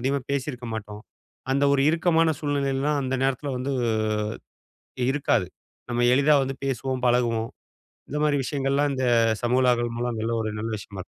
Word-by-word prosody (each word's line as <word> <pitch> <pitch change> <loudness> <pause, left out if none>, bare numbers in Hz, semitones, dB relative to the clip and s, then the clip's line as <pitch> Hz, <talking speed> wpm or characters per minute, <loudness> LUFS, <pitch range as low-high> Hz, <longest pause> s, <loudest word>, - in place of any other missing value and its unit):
அதிகமா 135 +2 0
பேசியிருக்க 130 -3 -3
மாட்டோம். 105 0 -7 0.5
அந்த 140 +1 +2
ஒரு 135 - +2
இறுக்கமான 165 -1 +3
சூழ்நிலையிலலாம் 145 0 0
அந்த 130 0 -2
நேரத்தில 135 +1 -1
வந்து 135 +2 -2 1.4
இருக்காது. 120 -9 +1 0.4
நம்ம 120 0 +2
எளிதா 145 +2 +5
வந்து, 135 0 -4
பேசுவோம், 130 0 -2
பழகுவோம். 115 -2 +1 0.6
இந்த 150 - -3
மாரி 145 -1 +2
விஷயங்கள்லாம், 140 +1 0
இந்த 130 -1 -1 0.4
சமூக 125 +2 +2
விழாக்கள் 120 -1 +1
மூலம், 120 -2 -2
எல்லாம் 115 0 0
ஒரு 110 - -2
நல்ல 115 0 -3
விஷயமா 100 -1 -10
இருக் - - -31
130 Hz, 150 wpm, -25 LUFS, 120-140 Hz, 1.4 s, எளிதா